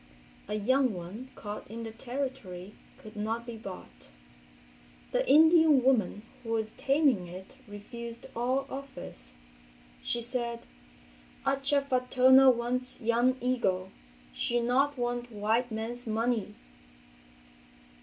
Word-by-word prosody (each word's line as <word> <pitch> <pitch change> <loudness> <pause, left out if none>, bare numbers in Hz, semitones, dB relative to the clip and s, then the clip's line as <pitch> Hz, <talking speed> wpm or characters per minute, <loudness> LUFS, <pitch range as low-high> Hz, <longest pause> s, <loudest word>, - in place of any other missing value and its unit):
A 210 - -2
young 255 +2 +2
one 190 +9 -8
caught 210 0 -7
in 230 +2 -6
the 225 - -6
Territory 230 -6 -5 0.2
could 220 -5 -13
not 220 +3 -2
be 235 -1 -6
bought. 185 - -10 1.0
The - - 0
Indian 315 -2 +6
woman 220 -5 +2 0.2
who 230 -2 -4
was 220 -1 -1
taming 270 - +2
it 185 +9 -10
refused 230 +3 -8
all 255 +3 0
offers. 265 - -6 0.7
She 240 - -1
said, 235 -1 -2 0.8
"Ah 275 - +2
cha 280 +1 +1
fa 255 -2 -1
tona 260 +1 +7
wants 250 +1 -1
young 240 +3 +2
eagle, 190 -7 0 0.4
she 240 - 0
not 265 +4 +2
want 245 0 -2
white 220 +3 0
man's 230 +2 -4
money!" 225 0 -1
240 Hz, 120 wpm, -30 LUFS, 215-260 Hz, 1.0 s, tona